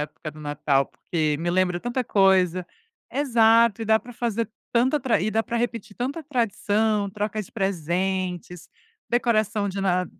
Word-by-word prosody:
época 150 Hz, +1 st, -7 dB
do 155 Hz, +1 st, -13 dB
Natal, 145 Hz, -2 st, +1 dB
porque 155 Hz, -3 st, -2 dB
me 175 Hz, +1 st, -1 dB
lembra 180 Hz, -1 st, +1 dB
tanta 245 Hz, +3 st, -2 dB
coisa. 185 Hz, -4 st, +3 dB, 0.5 s
Exato, 230 Hz, -5 st, +4 dB
e -, -, -2 dB
dá 220 Hz, 0 st, +4 dB
para 245 Hz, +2 st, -12 dB
fazer 230 Hz, -2 st, -2 dB, 0.2 s
tanta 260 Hz, +5 st, +2 dB
tra 250 Hz, -, +1 dB
e 205 Hz, +4 st, 0 dB
dá 225 Hz, +1 st, +1 dB
para 235 Hz, -, -3 dB
repetir 230 Hz, -3 st, -3 dB
tanta 275 Hz, +7 st, -3 dB
tradição, 220 Hz, -6 st, 0 dB
troca 210 Hz, +1 st, -3 dB
de -, -, -15 dB
presentes, 180 Hz, -1 st, -2 dB, 0.4 s
decoração 220 Hz, -3 st, +1 dB
de 195 Hz, 0 st, -4 dB
Na 180 Hz, -2 st, +1 dB
205 Hz, 160 wpm, -24 LUFS, 180-230 Hz, 0.5 s, Exato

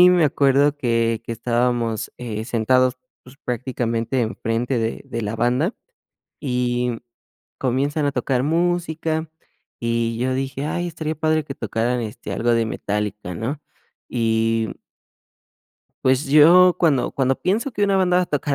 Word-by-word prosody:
y 180 Hz, -, +9 dB
me 175 Hz, -3 st, +4 dB
acuerdo 140 Hz, 0 st, +3 dB
que 115 Hz, -4 st, +1 dB
que -, -, -4 dB
estábamos, 120 Hz, -1 st, 0 dB
eh, 110 Hz, -3 st, -4 dB
sentados, 130 Hz, +2 st, +2 dB, 0.3 s
pues, 130 Hz, +2 st, -15 dB
prácticamente 120 Hz, 0 st, -1 dB
en 115 Hz, 0 st, -2 dB
frente 120 Hz, +3 st, -1 dB
de 115 Hz, 0 st, -2 dB
de 115 Hz, -4 st, -4 dB
la 105 Hz, +1 st, -3 dB
banda, 125 Hz, -, +1 dB, 0.7 s
y 125 Hz, -3 st, -1 dB, 0.6 s
comienzan 140 Hz, +4 st, 0 dB
a 140 Hz, -, 0 dB
tocar 130 Hz, -3 st, 0 dB
música, 165 Hz, -1 st, 0 dB, 0.5 s
y 115 Hz, -1 st, -1 dB
yo 130 Hz, +1 st, 0 dB
dije: 135 Hz, +2 st, -3 dB
"Ay, 175 Hz, +3 st, -2 dB
estaría 160 Hz, -1 st, -4 dB
padre 155 Hz, 0 st, +1 dB
que 135 Hz, -2 st, -6 dB
tocaran, 115 Hz, +2 st, -1 dB
este, 110 Hz, -2 st, -6 dB
algo 120 Hz, +1 st, +1 dB
de 115 Hz, -1 st, +2 dB
Metallica", 105 Hz, -3 st, -3 dB
¿no? 130 Hz, -, -4 dB, 0.5 s
Y, 115 Hz, -1 st, +1 dB, 1.3 s
pues, 130 Hz, +2 st, +2 dB
yo 170 Hz, +5 st, +7 dB
cuando 150 Hz, -7 st, +2 dB
cuando 135 Hz, -1 st, +1 dB
pienso 220 Hz, +9 st, 0 dB
que 205 Hz, -, +1 dB
una 200 Hz, -1 st, +2 dB
banda 180 Hz, -2 st, +3 dB
va -, -, +3 dB
a -, -, -16 dB
tocar 145 Hz, -2 st, -1 dB
130 Hz, 150 wpm, -22 LUFS, 115-150 Hz, 1.3 s, y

